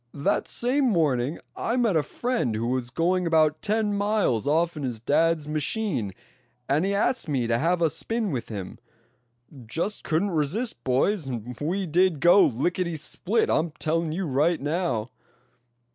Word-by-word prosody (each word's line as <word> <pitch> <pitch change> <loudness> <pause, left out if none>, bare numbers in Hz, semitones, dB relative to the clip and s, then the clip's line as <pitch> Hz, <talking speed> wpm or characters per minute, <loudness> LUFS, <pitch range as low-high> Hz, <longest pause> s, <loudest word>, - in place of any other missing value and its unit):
That 150 +8 0
same 265 +4 +1
morning 150 - +1 0.2
I 230 - -1
met 230 -7 +2
a 160 - +4
friend 235 - -2
who 110 +2 -2
was 125 0 -1
going 175 +6 0
about 155 -2 +3
ten 215 -1 0
miles 200 - +1
off 165 +3 +2
in 150 - -6
his 125 -5 -3
dad's 155 +5 +1
machine, 150 - -1 0.6
and 145 +4 +2
he 195 - 0
asked 235 -1 0
me 130 -5 0
to 115 0 +1
have 170 +2 +1
a 165 - +4
spin 220 +5 -2
with 125 -5 -4
him. 100 -4 -7 0.9
Just 170 - -2
couldn't 175 +6 0
resist, 175 - -2
boys, 135 +6 +1
and 125 -1 -5
we 185 +6 -1
did 175 -1 +2
go 175 +6 +6
licketty 170 - -1
split. 200 +8 0
I'm 160 0 0
telling 165 0 -1
you 185 +4 -2
right 155 +4 +1
now." 145 -6 -2
165 Hz, 160 wpm, -25 LUFS, 135-195 Hz, 0.9 s, go